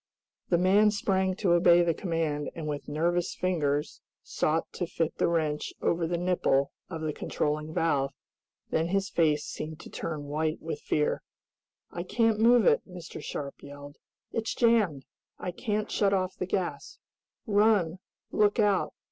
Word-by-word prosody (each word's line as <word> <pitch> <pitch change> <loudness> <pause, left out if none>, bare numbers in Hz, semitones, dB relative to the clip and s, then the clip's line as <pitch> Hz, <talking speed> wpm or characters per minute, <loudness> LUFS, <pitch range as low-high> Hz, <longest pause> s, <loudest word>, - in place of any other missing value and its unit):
The 175 - +4
man 195 +4 +5
sprang 190 -2 0
to 190 -2 +1
obey 175 0 +6
the 170 -1 +2
command, 160 -5 -2
and, 160 -2 -5
with 145 -1 -4
nervous 170 +4 0
fingers, 150 -5 -1 0.2
sought 160 +2 0
to 175 - -3
fit 165 -1 -2
the - - +3
wrench 155 -3 -1
over 170 -1 +1
the 175 +1 -1
nipple 170 -6 +1 0.2
of 165 -3 -5
the 155 -1 -2
controlling 150 +2 -2
valve. 145 -4 +1 0.6
Then 160 +1 +1
his 195 +2 0
face 150 -3 +2
seemed 155 0 -6
to - - -12
turn 155 -3 -4
white 155 +2 -2
with 160 -2 -5
fear. 150 -1 0 0.7
"I 175 - -4
can't 225 +4 +1
move 235 0 +5
it!" - - +5
Mr. 175 -3 -8
Sharp 140 -1 -6
yelled. 145 0 -11 0.3
"It's 225 -1 -2
jammed! 210 - +2 0.3
I 180 - -4
can't 210 +2 -2
shut 200 -1 +2
off 185 -1 -1
the 185 - -4
gas! 185 -1 -3 0.5
Run! 205 -5 +3 0.3
Look 210 +1 +3
out! 205 -3 +2
170 Hz, 155 wpm, -28 LUFS, 155-195 Hz, 0.7 s, obey